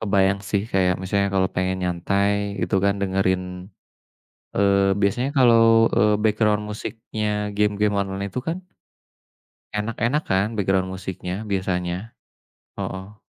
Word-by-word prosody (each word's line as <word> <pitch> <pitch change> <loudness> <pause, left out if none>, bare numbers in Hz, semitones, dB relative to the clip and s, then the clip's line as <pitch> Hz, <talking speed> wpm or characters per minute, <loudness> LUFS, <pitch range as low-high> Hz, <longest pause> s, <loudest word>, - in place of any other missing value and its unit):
Kebayang, 100 -1 +2
sih, 100 -2 +1
kayak 90 -1 +3
misalnya 100 +1 +1
kalau 95 -1 +2
pengen 95 +1 0
nyantai 100 +3 +1 0.3
itu, 95 - -1
kan, 100 - +3
dengerin 95 -1 +1 1.2
eee, 100 0 +3
biasanya 110 +7 +1
kalau, 120 -3 +6 0.4
eee, 105 +1 +4
background 105 -1 +2
musiknya 110 0 -5 0.3
game-game 105 0 +1
online 95 0 -3
itu, 125 - -4
kan 165 - -1 1.2
Enak-enak, 115 +7 0
kan, 95 +1 +3
background 95 -2 +1
musiknya 90 -1 -5 0.2
biasanya. 90 -2 -1 0.8
Heeh. 95 +3 -6
100 Hz, 115 wpm, -23 LUFS, 95-105 Hz, 1.2 s, kalau